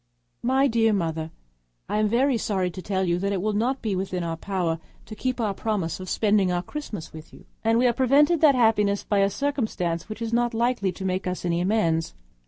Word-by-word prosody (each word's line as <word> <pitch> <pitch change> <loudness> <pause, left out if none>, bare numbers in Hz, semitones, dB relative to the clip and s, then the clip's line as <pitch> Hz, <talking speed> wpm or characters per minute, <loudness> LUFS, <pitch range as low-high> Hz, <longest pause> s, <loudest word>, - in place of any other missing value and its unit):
My 265 +3 +3
dear 225 -3 +2
Mother,—I 110 - -5
am 215 - +3
very 250 +5 +2
sorry 190 -5 -1
to 185 - -8
tell 190 +1 -1
you 175 -1 +1
that 200 +2 -1
it 195 - 0
will 215 +3 -1
not 245 +6 0
be 220 - -1
in 185 -1 -2
our 165 -1 -2
power 175 -2 -2 0.3
to 215 - -9
keep 255 +2 -2
our 215 -4 0
promise 190 -6 -2
of 185 0 -7
spending 205 -4 +2
our 175 0 -1
Christmas 215 - -7
with 160 0 -11
you; - - -16 0.2
and 225 0 +3
we 250 - +3
are 240 - +4
prevented 285 +6 +3
that 295 -4 +6
happiness 210 -4 +2
by 205 - +1
a 195 0 +3
circumstance 210 - -2
which 215 +2 -5
is 230 0 -4
not 240 0 +1
likely 235 -4 +1
to 190 +2 -7
make 185 0 -1
us 180 0 -3
any 170 0 0
amends. 170 -5 0
205 Hz, 215 wpm, -25 LUFS, 180-235 Hz, 0.3 s, that